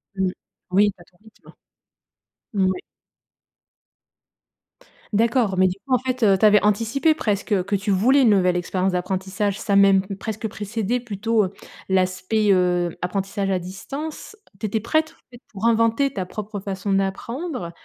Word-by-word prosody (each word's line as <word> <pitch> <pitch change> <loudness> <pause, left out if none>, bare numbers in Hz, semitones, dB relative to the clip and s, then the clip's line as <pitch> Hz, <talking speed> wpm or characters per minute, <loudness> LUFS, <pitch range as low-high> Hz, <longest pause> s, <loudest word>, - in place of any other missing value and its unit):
Mmh. 190 -1 0 0.4
Oui, 205 +2 +4
à 175 - -15
ton 175 - -29
rythme. 220 0 -19 1.0
Moui. 190 -2 +1 2.3
D'accord, 225 -2 +2
mais 185 0 +5
du 180 - -2
coup, 265 - -1
en - - +1
fait, 255 -1 -3
heu, 195 -2 +5
tu 215 - +3
avais 210 -1 +6
anticipé 230 +9 +2
presque 205 -6 -1
que 200 +2 -1
tu 200 +1 -2
voulais 255 +8 +4
une 230 - +5
nouvelle 180 -3 +3
expérience 185 +2 -1
d'apprentissage, 190 +2 -2
ça 205 - -2
a - - +4
même 195 -1 +6 0.2
presque 220 0 -4
précédé 220 +3 -2
plutôt, 220 -1 0
heu, 190 - -7 0.3
l'aspect, 190 +3 +1
heu, 180 -2 +2
apprentissage 195 +2 -2
à 190 - +1
distance. 275 - -7 0.2
Tu 220 - -3
étais 215 +2 -1
prête, 315 +7 0
en - - -32
fait, 240 +1 -14
pour 200 +3 -4
inventer 230 +4 +3
ta 185 -2 -3
propre 210 +1 -6
façon 195 0 -4
d'apprendre 195 - -2
200 Hz, 160 wpm, -22 LUFS, 190-230 Hz, 2.3 s, avais